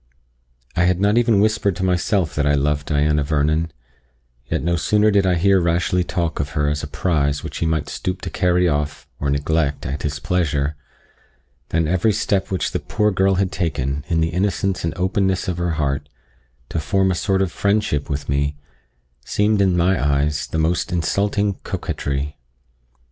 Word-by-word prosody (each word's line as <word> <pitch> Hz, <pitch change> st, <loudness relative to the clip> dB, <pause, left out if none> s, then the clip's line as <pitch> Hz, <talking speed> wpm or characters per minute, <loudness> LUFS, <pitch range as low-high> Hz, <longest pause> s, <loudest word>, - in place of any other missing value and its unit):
I 85 Hz, -, +3 dB
had 90 Hz, 0 st, +2 dB
not 105 Hz, +4 st, +3 dB
even 115 Hz, -4 st, +3 dB
whispered 105 Hz, -2 st, +2 dB
to 95 Hz, -, -4 dB
myself 90 Hz, -2 st, +1 dB
that 75 Hz, -1 st, 0 dB
I 75 Hz, -, +3 dB
loved 75 Hz, +1 st, 0 dB
Diana 75 Hz, 0 st, +2 dB
Vernon; 75 Hz, +2 st, +1 dB, 0.8 s
yet -, -, -1 dB
no 85 Hz, +1 st, +1 dB
sooner 105 Hz, +5 st, +3 dB
did 100 Hz, -2 st, +3 dB
I 90 Hz, -, +3 dB
hear 95 Hz, +3 st, +4 dB
Rashleigh 85 Hz, +2 st, +1 dB
talk 85 Hz, -2 st, -2 dB
of 70 Hz, +1 st, -3 dB
her 75 Hz, -1 st, +2 dB
as 75 Hz, 0 st, -1 dB
a -, -, -5 dB
prize 75 Hz, -3 st, 0 dB
which -, -, -6 dB
he 85 Hz, -, 0 dB
might 80 Hz, -2 st, 0 dB
stoop 90 Hz, 0 st, -3 dB
to -, -, -5 dB
carry 90 Hz, -1 st, +2 dB
off, 75 Hz, -2 st, -2 dB
or 70 Hz, -, -1 dB
neglect, 70 Hz, +1 st, 0 dB
at 70 Hz, +2 st, -3 dB
his 75 Hz, 0 st, -2 dB
pleasure, 75 Hz, -3 st, 0 dB, 0.9 s
than 80 Hz, -1 st, +1 dB
every 95 Hz, +6 st, +2 dB
step 100 Hz, -1 st, 0 dB
which 95 Hz, -, -1 dB
the -, -, -1 dB
poor 105 Hz, 0 st, 0 dB
girl 95 Hz, 0 st, +2 dB
had 95 Hz, 0 st, 0 dB
taken, 70 Hz, -5 st, -2 dB
in 80 Hz, -2 st, +1 dB
the 80 Hz, -, +1 dB
innocence 95 Hz, +1 st, -1 dB
and 85 Hz, -, -2 dB
openness 95 Hz, +1 st, 0 dB
of 90 Hz, -1 st, -2 dB
her 85 Hz, -1 st, 0 dB
heart, 70 Hz, -1 st, -1 dB, 0.6 s
to 80 Hz, -, -2 dB
form 95 Hz, +5 st, +1 dB
a -, -, +2 dB
sort 95 Hz, +2 st, +1 dB
of 95 Hz, -, -2 dB
friendship 100 Hz, -9 st, 0 dB
with 70 Hz, 0 st, -3 dB
me, 70 Hz, +1 st, 0 dB, 0.7 s
seemed 105 Hz, +8 st, +1 dB
in 95 Hz, -2 st, +3 dB
my 90 Hz, 0 st, +2 dB
eyes 75 Hz, +1 st, +1 dB
the -, -, -3 dB
most 80 Hz, +2 st, 0 dB
insulting 100 Hz, +4 st, 0 dB
coquetry. 70 Hz, +1 st, -3 dB
85 Hz, 180 wpm, -21 LUFS, 75-95 Hz, 0.9 s, hear